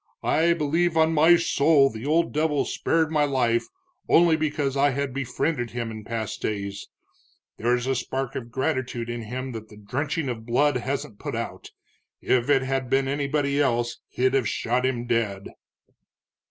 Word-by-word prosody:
"I 170 +2 +3
believe 165 +2 +1
on 160 0 +4
my 160 +3 +6
soul 145 -4 +3
the 110 +5 -6
old 165 +2 +2
devil 150 -1 +1
spared 160 -1 0
my 150 -2 +2
life 125 -5 +1 0.4
only 170 -1 +5
because 150 -3 -1
I 140 +1 +4
had 140 -1 -2
befriended 130 0 -2
him 115 -1 -4
in 110 -1 -8
past 110 -1 -4
days. 100 -1 -4 0.7
There's 120 +2 +1
a 135 - +1
spark 130 +1 -3
of 120 -2 -5
gratitude 125 -2 -2
in 120 0 -4
him 130 +4 -5
that 110 -2 -8
the 105 - -14
drenching 145 +8 -3
of 115 -3 -4
blood 130 +4 +2
hasn't 125 -4 -4
put - - -4
out. - - -5 0.5
If 125 +1 +1
it 135 -2 +4
had 130 -1 -2
been 135 +1 +2
anybody 140 0 0
else 120 -3 0
he'd 130 +1 0
have 135 -5 +2
shot 125 +2 0
him 120 -2 -2
dead." 110 -5 -1
130 Hz, 165 wpm, -25 LUFS, 120-145 Hz, 0.7 s, my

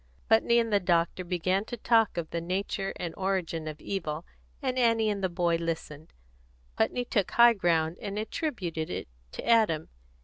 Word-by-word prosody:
Putney 225 +1 +4
and 230 -2 +1
the 205 - +5
doctor 175 0 +1
began 185 +2 0
to 240 - -6
talk 225 -3 +3
of 165 -2 -3
the 170 - -2
nature 195 +2 -2
and 170 -2 -5
origin 185 -4 -2
of 155 -1 -6
evil, 165 -4 -4 0.3
and 260 -2 -1
Annie 230 -3 +3
and 200 -1 -4
the 185 - +2
boy 170 -1 +1
listened. 160 -2 -5 0.6
Putney 245 - 0
took 205 -5 0
high 235 0 +7
ground, 170 -4 +1
and 200 0 -4
attributed 205 - -3
it - - -4 0.3
to - - -7
Adam. 215 -10 +3
185 Hz, 170 wpm, -28 LUFS, 165-220 Hz, 0.6 s, high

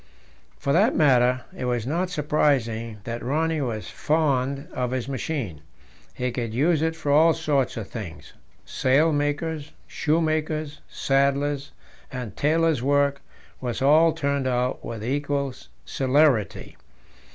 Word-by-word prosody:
For 140 - -1
that 210 +9 +4
matter, 125 -4 +4
it - - -4
was 120 -2 -1
not 170 +7 -1
surprising 130 -8 0
that 115 +1 -5
Rönne 155 +1 0
was 110 -3 -4
fond 140 -3 0
of 125 -1 -1
his 130 -1 -3
machine. 130 - -4 0.5
He 125 0 -2
could 115 -2 -4
use 155 +4 +2
it 160 0 0
for 150 -3 -2
all 160 +3 +5
sorts 145 -6 0
of 110 -4 -5
things 100 -9 -8 0.3
sailmaker's, 145 +2 0
shoemaker's, 155 -1 -1
saddler's, 140 +1 0 0.4
and 125 -6 -6
tailor's 160 -2 +2
work 140 +1 +2 0.4
was 125 -2 -3
all 155 +5 +5
turned 140 -2 -1
out 125 0 -1
with 110 -2 -6
equal 140 0 -1 0.3
celerity. 135 -5 +1
140 Hz, 125 wpm, -24 LUFS, 125-155 Hz, 0.5 s, all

